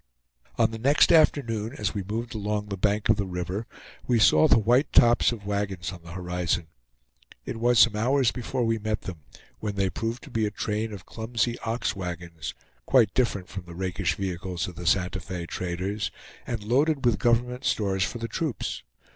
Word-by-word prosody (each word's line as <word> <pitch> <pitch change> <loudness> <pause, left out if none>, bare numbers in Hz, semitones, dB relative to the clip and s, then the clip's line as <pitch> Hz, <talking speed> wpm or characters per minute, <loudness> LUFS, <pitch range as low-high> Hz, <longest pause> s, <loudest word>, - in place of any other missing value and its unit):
On - - +3
the 110 - -6
next 140 +6 +4
afternoon, 115 -8 +3
as 105 -2 -1
we 100 - -2
moved 115 +5 -4
along 105 -1 -2
the 100 - -2
bank 100 +2 0
of 110 - +4
the 100 -2 -1
river, 90 +4 -4 0.4
we 120 - +3
saw 135 +7 +6
the - - +6
white 120 +6 +3
tops 120 +1 +5
of 110 -4 -7
wagons 100 -4 -2
on 90 -3 -10
the 85 0 -10
horizon. 90 -2 -1 0.8
It - - -4
was 120 +1 +3
some 115 -2 +6
hours 125 +3 +2
before 125 0 -2
we 115 0 +1
met 110 0 -2
them, 90 -4 -7 0.4
when 105 +3 -3
they 95 -1 0
proved 115 +2 -3
to 140 - -12
be 110 -2 +1
a - - -1
train 105 +1 -2
of 100 -3 -9
clumsy 115 +1 -2
ox 115 +2 -2
wagons, 85 -3 -6 0.3
quite 125 -5 +4
different 100 -7 0
from 95 -2 -7
the 85 -1 -10
rakish 90 0 -1
vehicles 90 -2 -3
of 90 - -7
the 85 - -6
Santa 95 +1 +2
Fe 90 -1 -5
traders, 90 +4 -3 0.4
and 115 -3 -3
loaded 135 +5 +2
with 120 - +3
government 120 +1 +1
stores 95 -3 +1
for 105 - -2
the 115 0 -4
troops. 140 +2 -3
105 Hz, 190 wpm, -26 LUFS, 95-115 Hz, 0.8 s, saw